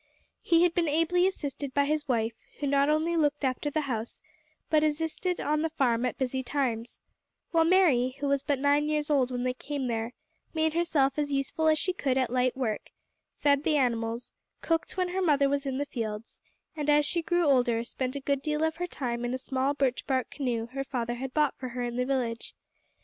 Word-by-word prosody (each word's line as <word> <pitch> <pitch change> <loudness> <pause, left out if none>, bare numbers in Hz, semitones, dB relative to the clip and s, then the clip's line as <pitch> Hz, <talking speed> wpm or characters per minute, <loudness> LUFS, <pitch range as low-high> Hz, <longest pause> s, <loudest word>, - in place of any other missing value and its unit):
He 335 0 +4
had 350 -1 +3
been 340 -1 +1
ably 330 +4 +3
assisted 285 -6 -4
by 285 0 +4
his 300 0 -1
wife, 230 -3 +1 0.3
who 290 - -2
not 280 +1 +3
only 315 +3 +1
looked 295 -2 +1
after 265 +2 0
the 310 +2 0
house, 240 -5 -4 0.5
but 310 -1 +3
assisted 320 +4 -1
on 305 +1 0
the 325 - 0
farm 255 -6 +1
at - - -4
busy 260 -1 -1
times; 245 -4 -2 0.5
while 330 -2 +4
Mary, 300 -9 +4
who 285 - -1
was 280 -1 +2
but 285 0 0
nine 290 +2 +2
years 300 0 0
old 265 -4 +3
when 245 -1 -3
they 255 0 0
came 275 +1 -4
there, 230 0 -2 0.4
made 315 0 +1
herself 300 -5 +1
as 290 -1 -1
useful 275 +3 0
as 310 0 +5
she 370 +4 0
could 270 -7 0
at 255 -3 +1
light 255 0 +1
work, 225 -5 -2 0.5
fed 285 -1 +3
the 305 -1 +2
animals, 235 -2 -1 0.3
cooked 330 +2 -1
when 365 -1 +1
her 375 +2 -1
mother 290 -5 +3
was 280 0 -1
in 265 -1 -2
the 285 - -1
fields, 225 -4 -5 0.3
and 300 -1 -2
as 295 0 +5
she 340 +3 0
grew 345 +1 +1
older 245 -5 +3
spent 255 +2 -4
a - - -2
good 280 0 0
deal 300 +1 -1
of 320 0 0
her 355 +1 -2
time 240 -7 -3
in 240 +1 -1
a - - -2
small 265 +2 -1
birch 265 -3 0
bark 260 -2 0
canoe 245 -5 -2
her 275 0 -2
father 240 -3 -3
had 260 +2 -5
bought 300 0 +2
for 255 - -4
her 245 +1 -4
in 240 0 -3
the 250 +1 0
village. 240 -4 -2
280 Hz, 215 wpm, -28 LUFS, 250-305 Hz, 0.5 s, as